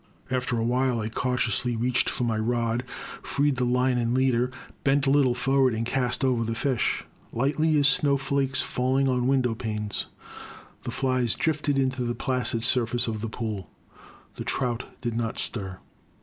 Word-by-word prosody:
After 125 -1 0
a 115 - 0
while 125 0 +1
I 110 0 -2
cautiously 125 0 0
reached 125 +3 +1
for 125 - -1
my 115 -2 0
rod, 115 +1 0 0.4
freed 145 -1 +1
the 125 - +1
line 125 0 +2
and 120 +1 0
leader, 125 -1 +2 0.3
bent 140 0 +3
a 135 - +3
little 135 -4 +4
forward, 135 -1 +2
and 115 +1 -2
cast 125 +1 0
over 125 -3 +2
the 115 0 -2
fish. 125 -1 0 0.3
Lightly 150 +5 +1
as 145 -1 +5
snowflakes 140 -3 +2
falling 130 +2 +1
on 125 -1 +1
window 130 -3 +2
panes, 105 -2 -3 0.7
the - - -6
flies 130 -4 +1
drifted 145 -3 0
onto 130 -1 0
the 120 0 -2
placid 125 -2 -1
surface 120 0 +1
of 110 -2 -3
the 115 - -3
pool. 110 -4 -4 0.7
The - - -4
trout 125 -2 -1 0.2
did 120 -2 -2
not 115 -1 -2
stir. 95 -5 -3
125 Hz, 165 wpm, -26 LUFS, 115-135 Hz, 0.7 s, as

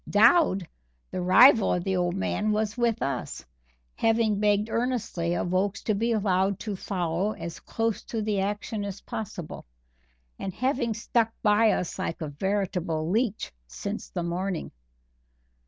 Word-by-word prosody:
Dowd, 210 - +5 0.4
the 185 - -3
rival 215 +6 +6
of 180 - -2
the 190 0 0
old 175 0 0
man, 210 +2 0
was 210 0 0
with 235 -2 +1
us, 140 - -4 0.5
having 225 -2 +2
begged 210 0 +2
earnestly 230 -8 -1
of 175 - -2
Oakes 195 +3 0
to 215 - +1
be 230 +4 0
allowed 195 -3 +1
to 210 -3 -3
follow 185 +1 -1
as 170 -5 -7
close 225 -1 -2
to 225 -2 -3
the 210 -2 0
action 205 +2 -2
as 200 0 -6
possible, 185 -7 -6 0.8
and 190 - -5
having 250 -3 0
stuck 230 0 +1
by 215 +1 +5
us 180 - -1
like 165 - -3
a 155 -3 -4
veritable 180 -1 -1
leech 220 0 0 0.2
since 200 - -5
the 175 - -3
morning. 175 +1 -3
205 Hz, 150 wpm, -27 LUFS, 180-225 Hz, 0.8 s, rival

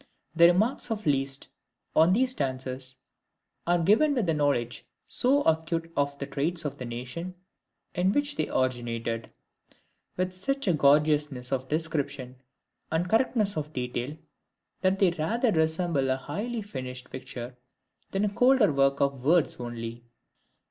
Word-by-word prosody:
The 170 +1 +8
remarks 215 +8 +2
of 220 -1 -3
Liszt 135 -2 0 0.5
on 160 +3 +6
these 255 +5 +2
dances 130 - -3 0.7
are 175 0 +4
given 215 - +3
with 230 -8 0
a - - +3
knowledge 140 -4 0 0.2
so 280 +3 +3
acute 165 +1 0
of 140 0 0
the 140 - -4
traits 160 +4 -1
of 145 - -4
the 125 - -5
nation 125 +10 -6 0.6
in 180 +2 +2
which 290 +4 +1
they - - -1
originated, 115 -3 -2 0.9
with 185 0 -1
such 275 +7 -2
a 180 - +4
gorgeousness 145 -3 +2
of 130 -1 -2
description 145 -5 -2 0.5
and 165 +3 0
correctness 220 -1 +2
of 150 0 -4
detail, 125 +3 -3 0.6
that 190 0 +2
they 195 -3 +4
rather 220 +9 0
resemble 160 -4 +1
a 130 - +3
highly 215 - -4
finished 130 -8 -7
picture, 125 -1 -7 0.5
than 195 +2 0
a 205 - -2
colder 245 - +4
work 135 0 +2
of 140 -2 0
words 165 +3 +3
only. 120 -1 -6
155 Hz, 140 wpm, -27 LUFS, 130-190 Hz, 0.9 s, The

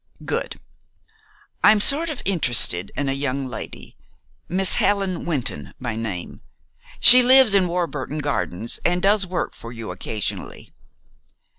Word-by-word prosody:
"Good. - - -4 1.0
I'm 215 0 +5
sort 300 +10 +4
of 300 - -7
interested 120 - +3
in 140 - -3
a 135 - -1
young 135 0 -4
lady, 120 - -10 0.5
Miss 190 +1 0
Helen 195 -4 -1
Wynton 150 -8 -4
by 120 -4 -5
name. 105 -6 -7 0.6
She 250 +1 +9
lives 255 -3 +5
in 190 -2 +2
Warburton 170 -5 -5
Gardens, 120 -8 -3
and 175 +1 0
does 200 0 +1
work 180 0 -4
for 115 - -12
you 115 -4 -8
occasionally. 105 +3 -6
165 Hz, 130 wpm, -20 LUFS, 120-195 Hz, 1.0 s, She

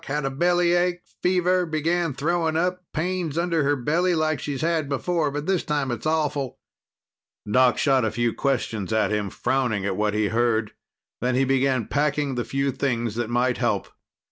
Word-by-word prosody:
Had 145 0 -2
a 135 - -1
bellyache, 175 +3 +2 0.2
fever, 180 0 +2
began 160 -1 0
throwing 160 +1 0
up. 180 +2 0
Pains 170 -1 -2
under 170 -2 +1
her 145 +1 +2
belly, 165 +7 +1
like 155 -1 0
she's 140 -2 -4
had 160 -3 0
before. 160 +3 0
But 145 +1 -4
this 190 -1 +1
time 145 -4 -1
it's 120 +5 -3
awful." 150 -4 -1 0.9
Doc 125 +3 +4
shot 135 -3 +3
a 110 - +1
few 120 +1 0
questions 115 -8 -1
at 110 -1 +1
him, 105 -2 -1
frowning 120 -4 -1
at 100 -2 -1
what 105 +1 0
he 105 -1 +1
heard. 115 -2 +1 0.5
Then 125 +1 0
he 135 +1 +3
began 130 -3 +1
packing 145 -1 0
the 120 -1 -1
few 135 +2 -1
things 120 -4 -1
that 120 0 -3
might 125 +1 +1
help. - - 0
140 Hz, 175 wpm, -24 LUFS, 120-165 Hz, 0.9 s, Doc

